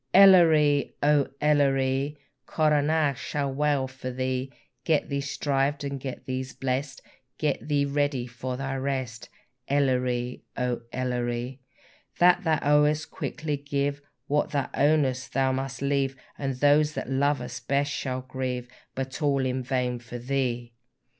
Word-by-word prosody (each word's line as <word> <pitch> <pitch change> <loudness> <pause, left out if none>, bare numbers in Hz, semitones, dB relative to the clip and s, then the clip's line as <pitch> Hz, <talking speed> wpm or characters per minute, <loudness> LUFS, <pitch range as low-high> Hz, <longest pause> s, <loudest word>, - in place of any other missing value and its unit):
Elleree! 160 -7 +6
O 145 -1 +4
Elleree! 140 -1 +2 0.3
Coronach 150 -2 +2
shall 140 -2 -2
wail 145 -1 +1
for 130 -1 -7
thee; 130 +1 -2 0.3
Get 155 -3 +1
thee 140 -1 -1
shrived 140 0 -1
and 140 -1 -3
get 130 -1 -6
thee 130 0 -2 0.2
blest, 130 +1 -2 0.3
Get 150 -2 -1
thee 145 -1 +2
ready 140 -3 0
for 125 +1 -5
thy 135 0 -3
rest, 130 -4 -3 0.4
Elleree! 125 -3 0 0.2
O 125 -1 -1
Elleree! 125 0 -2 0.6
That 180 +2 +5
thou 160 -2 +2
owest 150 +1 +3
quickly 155 -2 -3
give, 140 0 -2 0.2
What 145 +1 +1
thou 140 -3 -2
ownest 140 -3 +1
thou 135 -1 +2
must 135 +1 -3
leave, 140 -1 +1 0.2
And 135 -2 -3
those 145 +3 +4
thou - - -3
lovest 135 -2 -1
best 140 +1 +1
shall 130 -2 -3
grieve, 130 -1 -4 0.3
But 130 +2 -4
all 140 -3 +2
in 130 0 -1
vain 125 -1 -1
for 120 +1 -8
thee! 120 -2 -2
135 Hz, 135 wpm, -27 LUFS, 130-145 Hz, 0.6 s, Elleree